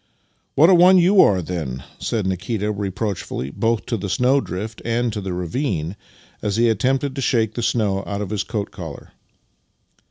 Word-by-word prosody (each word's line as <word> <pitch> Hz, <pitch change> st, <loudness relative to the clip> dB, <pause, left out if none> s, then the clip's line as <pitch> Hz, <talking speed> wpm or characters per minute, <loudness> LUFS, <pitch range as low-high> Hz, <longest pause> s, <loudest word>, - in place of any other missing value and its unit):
" -, -, -45 dB
What 160 Hz, +6 st, +6 dB
a -, -, +7 dB
one 180 Hz, +2 st, +7 dB
you 185 Hz, +3 st, +6 dB
are, 95 Hz, -3 st, +4 dB
then! 75 Hz, -7 st, -4 dB
" -, -, -27 dB
said 110 Hz, -4 st, -1 dB
Nikita, 100 Hz, +3 st, -2 dB
reproach 100 Hz, 0 st, -3 dB
fully, 65 Hz, +2 st, -5 dB
both 115 Hz, +5 st, 0 dB
to 115 Hz, -, -2 dB
the 100 Hz, 0 st, -4 dB
snowdrift 110 Hz, -4 st, 0 dB
and 120 Hz, 0 st, 0 dB
to 105 Hz, -, -3 dB
the 95 Hz, -1 st, -4 dB
ravine, 90 Hz, -, -2 dB, 0.5 s
as 105 Hz, -2 st, -1 dB
he 115 Hz, +1 st, +3 dB
attempted 130 Hz, +5 st, +1 dB
to 135 Hz, -, -3 dB
shake 115 Hz, -4 st, +1 dB
the 120 Hz, -, -3 dB
snow 105 Hz, -4 st, 0 dB
out 100 Hz, 0 st, -3 dB
of 100 Hz, -1 st, -4 dB
his 105 Hz, -2 st, 0 dB
coat 105 Hz, -3 st, -4 dB
collar. -, -, -9 dB
105 Hz, 190 wpm, -21 LUFS, 95-120 Hz, 0.5 s, a